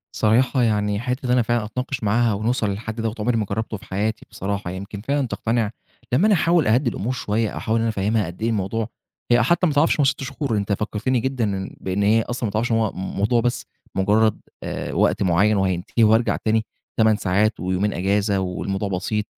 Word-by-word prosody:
صراحة 125 +4 +3
يعني 105 -2 +1
حتّة 125 +3 -3
إن 125 - 0
أنا 125 0 +4
فعلًا 120 -1 0
أتناقش 125 +4 -4
معاها 115 +2 +2
ونوصل 110 +1 0
للحد 110 +3 -4
دوَّة، 110 0 -2
عُمْرِي 115 +2 +1
ما 110 - 0
جربته 110 +2 -3
في - - -16
حياتي 110 +4 -2
بصراحة، 100 -2 -3
يمكن 100 +2 -7
فعلًا 140 +3 0
تقتنع 115 -2 -1 0.4
لمّا 165 +12 +4
أنا 215 - +5
أحاول 170 -4 +3
أهَدِّي 120 +4 +3
الأمور 115 +3 -3
شوية، 110 -2 -1
أو - - -7
أحاول 110 - -1
إن - - 0
أنا 115 - +1
أفهِمها 105 0 0
قد 85 +4 -9
إيه 115 - +1
الموضوع 110 +1 -1 0.4
هي 120 0 +6
حتى 170 +7 +3
ما 155 - 0
تعرفش 150 +2 +3
هُم - - +5
6 135 0 0
شهور، 135 -4 -2
أنت 100 0 0
فكرتِني 110 +5 -1
جدًا 130 0 -1
إن 95 -2 -3
بإن 95 +2 -1
هي 110 +2 +4
أصلًا 120 +1 -3
ما - - -4
تعرفش 110 +4 -1
إن 115 - +3
هو 110 -2 +1
الموضوع 100 +5 0
بس 120 0 -1 0.3
مجرد، 105 +3 +2 0.2
آآ، - - -4
وقت - - +2
معيَّن 100 +4 +3
وهينتهي 95 +4 +1
وأرجع 110 +2 +4
تاني 110 0 0 0.3
8 110 -1 +5
ساعات، 105 +4 +1
ويومين 95 +3 0
أجازة 100 +2 +1
والموضوع 95 +2 -2
بسيط، 100 +3 -1
110 Hz, 205 wpm, -22 LUFS, 100-120 Hz, 0.4 s, هي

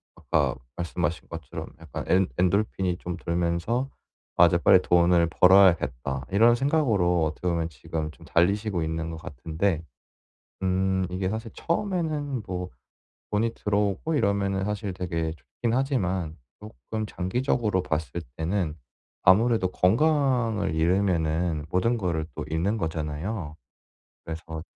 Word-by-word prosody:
아까 - - 0 0.2
말씀하신 85 -1 -2
것처럼 80 -4 -7
약간 - - -6
엔 95 0 +3
엔도르핀이 95 -1 +1
좀 90 0 -5
돌면서 85 +10 -1 0.5
'아 85 - +8
이제 85 0 +2
빨리 90 +2 +6
돈을 85 -1 +4
벌어야겠다.' 80 -9 +4
이런 115 +4 +5
생각으로 115 - +2
어떻게 80 +3 -3
보면 85 -1 0
지금 75 +2 -5
좀 - - -17
달리시고 95 +1 +1
있는 80 +1 -3
것 80 - -6
같은데 80 +3 -2 0.8
음 95 0 +1
이게 95 +1 -1
사실 110 +1 -4
처음에는 160 - -2
뭐 90 -1 -4 0.6
돈이 115 +2 +1
들어오고 105 - 0
이러면은 100 -5 +1
사실 105 -1 -3
되게 85 -3 -2
좋기는 115 - -2
하지만 95 - -1 0.2
쪼끔 110 +1 -6
장기적으로 105 0 0
봤을 80 -2 -2
때는 80 -1 -1 0.5
아무래도 110 +2 +4
건강을 115 - +2
잃으면은 85 -2 +1
모든 115 +6 +1
거를 85 -6 -1
또 - - -4
잃는 85 +8 0
거잖아요. 80 0 -3 0.7
그래서 80 0 -6
90 Hz, 300 characters per minute, -26 LUFS, 80-105 Hz, 0.8 s, 아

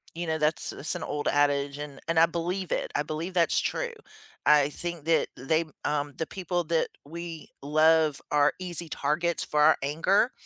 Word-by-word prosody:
you 170 0 -4
know, 160 0 0
that's 150 -1 +2
that's 155 - -3
an 175 - -4
old 145 0 -3
adage, 145 -1 +2
and 145 -2 -7
and 165 -1 +2
I 165 - +8
believe 175 +2 -3
it; - - -1
I 145 - +1
believe 155 +5 -4
that's 170 -2 +3
true. 485 -1 -2 0.5
I 150 -1 +5
think 170 +1 -5
that 165 0 +3
they, 160 +6 0 0.2
um, 145 -1 -1
the 160 - -1
people 175 0 -2
that 165 0 +1 0.2
we 165 +1 -8
love 155 0 +3
are 145 -1 +4
easy 175 -2 -3
targets 160 +4 0
for 150 - 0
our 155 +1 +6
anger, 170 - +2
160 Hz, 185 wpm, -27 LUFS, 150-170 Hz, 0.5 s, I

